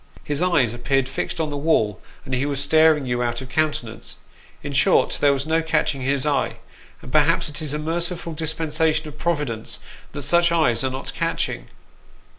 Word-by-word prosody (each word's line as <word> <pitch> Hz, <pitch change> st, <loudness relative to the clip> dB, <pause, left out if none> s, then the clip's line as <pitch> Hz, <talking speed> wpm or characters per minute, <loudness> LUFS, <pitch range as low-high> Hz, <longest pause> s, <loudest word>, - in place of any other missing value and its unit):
His 145 Hz, +1 st, -2 dB
eyes 145 Hz, -11 st, +2 dB
appeared 125 Hz, +2 st, 0 dB
fixed 135 Hz, -, -3 dB
on 155 Hz, -2 st, -1 dB
the 145 Hz, -, -3 dB
wall, 140 Hz, -, +1 dB, 0.2 s
and 130 Hz, -, -5 dB
he 130 Hz, +3 st, 0 dB
was 140 Hz, -2 st, -2 dB
staring 155 Hz, 0 st, +4 dB
you 120 Hz, -1 st, -1 dB
out 120 Hz, -1 st, -1 dB
of 130 Hz, -1 st, -9 dB
countenance; 145 Hz, -6 st, -2 dB, 0.5 s
in 145 Hz, -1 st, -5 dB
short, 155 Hz, +7 st, +3 dB
there 145 Hz, -, +5 dB
was 140 Hz, 0 st, -1 dB
no 160 Hz, +1 st, +2 dB
catching 155 Hz, -4 st, 0 dB
his 135 Hz, +1 st, 0 dB
eye, 140 Hz, -3 st, 0 dB, 0.5 s
and -, -, -10 dB
perhaps -, -, +3 dB
it 150 Hz, +2 st, -6 dB
is 150 Hz, -2 st, -1 dB
a -, -, -1 dB
merciful 170 Hz, +2 st, -2 dB
dispensation 160 Hz, 0 st, 0 dB
of 150 Hz, 0 st, -11 dB
Providence 145 Hz, -10 st, -2 dB, 0.3 s
that 145 Hz, -1 st, -4 dB
such 170 Hz, +2 st, +3 dB
eyes 155 Hz, -8 st, +2 dB
are 130 Hz, -, +1 dB
not 130 Hz, +1 st, -5 dB
catching. -, -, -2 dB
145 Hz, 185 wpm, -22 LUFS, 130-160 Hz, 0.5 s, there